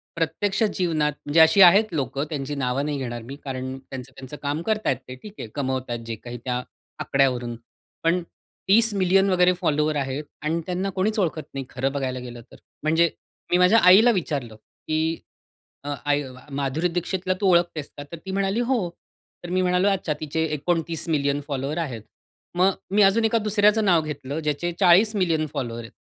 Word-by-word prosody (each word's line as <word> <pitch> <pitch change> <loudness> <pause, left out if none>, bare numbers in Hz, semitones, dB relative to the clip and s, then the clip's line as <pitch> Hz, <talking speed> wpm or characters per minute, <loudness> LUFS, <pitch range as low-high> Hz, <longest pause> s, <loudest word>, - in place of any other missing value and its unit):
प्रत्यक्ष 190 - -1
जीवनात, 165 -7 0
म्हणजे 145 +3 +2
अशी 160 +4 +7
आहेत 195 +2 +7
लोकं 140 -1 -2
त्यांची 145 -1 -4
नावं 135 0 -1
नाही 150 -1 -2
घेणार 120 -3 -4
मी, 135 +4 -8
कारण 130 -1 -5
त्यांचं 130 0 -9
त्यांचं 135 +2 -9
काम 145 +3 -1
करत 215 +3 -1
आहेत 130 - +2
ते 130 - -7
ठीक 210 - -10
आहे - - -5
कमवत 130 -2 -2
आहेत 120 -1 -4
जे 115 -1 -4
काही 120 +2 -9
त्या 125 -1 -1 0.4
आकड्यावरून. 125 -3 0 0.5
पण 170 +2 +2 0.5
30 225 +2 +5
मिलियन 195 0 +3
वगैरे 180 -1 +4
फॉलोवर 150 -2 +1
आहेत 135 +1 -2 0.2
आणि 160 +2 -1
त्यांना 185 +2 -2
कोणीच 210 +4 0
ओळखत 160 -4 -1
नाही 135 -1 -4
खरं 135 +2 -2
बघायला 130 -2 -3
गेलं 120 -1 -9
तर. - - -13 0.3
म्हणजे 160 +2 +3 0.4
मी 175 - +5
माझ्या 180 +5 +5
आईला 195 +7 +8
विचारलं 145 - -3
की, 155 +8 -3 0.7
अ, 145 0 -3
"आई, 145 0 +1 0.3
माधुरी 140 +5 -1
दीक्षितला 180 +2 -2
तू 200 - +3
ओळखतेस 170 -4 +1
का?" 145 - -6
तर 170 - -6
ती 190 - -4
म्हणाली, 195 +3 0
"हो." 240 -7 0 0.5
तर 175 - -7
मी 185 +1 +1
म्हणालो, 180 +2 +2
"अच्छा, 185 -5 0
तिचे 160 +1 -2
29 165 +1 -2
मिलियन 145 -2 +1
फॉलोअर्स 140 +2 -3
आहेत." 125 -8 -5 0.6
मग 185 +2 +5 0.2
मी 210 - +4
अजून 205 +3 +4
एका 225 +1 +2
दुसऱ्याचं 210 0 +2
नाव 175 -4 +4
घेतलं 145 -1 -5
ज्याचे 155 +3 -2
40 200 +4 +5
मिलियन 165 -5 +1
फॉलोअर्स 120 -5 -4
आहेत. 115 - -11
160 Hz, 180 wpm, -24 LUFS, 135-185 Hz, 0.7 s, आईला